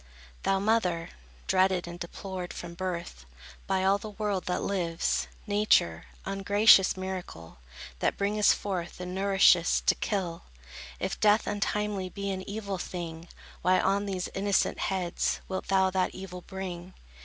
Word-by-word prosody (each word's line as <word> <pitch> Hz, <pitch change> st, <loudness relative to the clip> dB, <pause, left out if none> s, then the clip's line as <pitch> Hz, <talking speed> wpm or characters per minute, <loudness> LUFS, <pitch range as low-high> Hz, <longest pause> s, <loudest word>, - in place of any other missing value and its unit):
Thou 195 Hz, -, +2 dB
mother, 190 Hz, -5 st, +1 dB, 0.4 s
dreaded 185 Hz, -2 st, +2 dB
and 175 Hz, 0 st, -8 dB
deplored 180 Hz, +1 st, -6 dB
From 175 Hz, -1 st, -7 dB
birth, 170 Hz, -, -5 dB, 0.4 s
by 190 Hz, -1 st, +1 dB
all 195 Hz, +1 st, +3 dB
the 215 Hz, -, -7 dB
world 205 Hz, -2 st, -2 dB
that 180 Hz, -, -1 dB
lives, 175 Hz, -4 st, 0 dB, 0.2 s
Nature, 205 Hz, -, +2 dB, 0.2 s
ungracious 195 Hz, 0 st, +5 dB
miracle, 180 Hz, -, -6 dB, 0.4 s
That -, -, 0 dB
bringest 205 Hz, +1 st, +3 dB
forth 180 Hz, -4 st, -4 dB
and 180 Hz, 0 st, -5 dB
nourishest, 190 Hz, -2 st, +4 dB
to -, -, +5 dB
kill, 185 Hz, -6 st, -3 dB, 0.5 s
If 190 Hz, -, -3 dB
death 210 Hz, +1 st, +4 dB
untimely 205 Hz, -2 st, -1 dB
be 200 Hz, +1 st, -4 dB
an 190 Hz, -1 st, -3 dB
evil 200 Hz, -2 st, -4 dB
thing, 170 Hz, -2 st, -6 dB, 0.3 s
Why 185 Hz, +1 st, +4 dB
on 200 Hz, +1 st, +1 dB
these 185 Hz, -2 st, -2 dB
innocent 200 Hz, 0 st, +1 dB
heads 185 Hz, -2 st, -1 dB
Wilt 190 Hz, 0 st, -4 dB
thou 190 Hz, -1 st, +3 dB
that 185 Hz, 0 st, 0 dB
evil 185 Hz, -1 st, -7 dB
bring? 185 Hz, -1 st, -7 dB
190 Hz, 140 wpm, -29 LUFS, 180-200 Hz, 0.5 s, ungracious